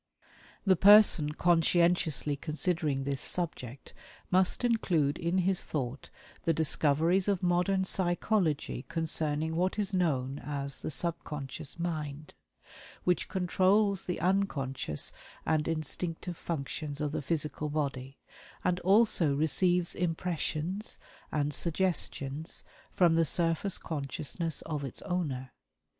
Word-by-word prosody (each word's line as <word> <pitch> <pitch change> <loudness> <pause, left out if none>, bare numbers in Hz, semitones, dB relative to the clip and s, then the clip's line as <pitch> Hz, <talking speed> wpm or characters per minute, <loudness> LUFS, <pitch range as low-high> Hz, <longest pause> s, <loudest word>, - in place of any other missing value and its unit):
The 190 -2 +5
person 195 -6 +6
conscientiously 170 -3 +2
considering 155 -2 -1
this 135 -1 -1
subject 140 -7 -2 0.4
must 185 +5 +3
include 170 -11 +1
in 170 +1 0
his 185 0 +2
thought 135 -2 -4 0.3
the 165 - +2
discoveries 160 +4 +2
of 195 -3 0
modern 180 +2 +2
psychology 175 - 0
concerning 160 -1 -1
what 185 +4 0
is 205 -2 0
known 140 -7 0
as 140 0 -3
the - - -3
"subconscious 150 -2 -3
mind," 155 -3 -4 0.7
which 180 -3 +1
controls 190 +2 +2
the 180 - -3
unconscious 150 - 0 0.3
and 155 -1 +1
instinctive 165 +2 -3
functions 150 -2 -4
of 150 -1 -1
the 150 - -2
physical 150 0 -2
body, 140 -3 -3 0.5
and 180 0 +1
also 185 -6 +3
receives 175 +4 +2
impressions 175 +2 -2 0.3
and 150 -1 0
suggestions 160 -3 -1 0.3
from 175 -3 +3
the 165 0 +4
surface 165 +4 +1
consciousness 155 +2 -3
of 150 -3 -4
its 135 - -6
owner. 140 -8 -3
165 Hz, 110 wpm, -30 LUFS, 145-180 Hz, 0.7 s, person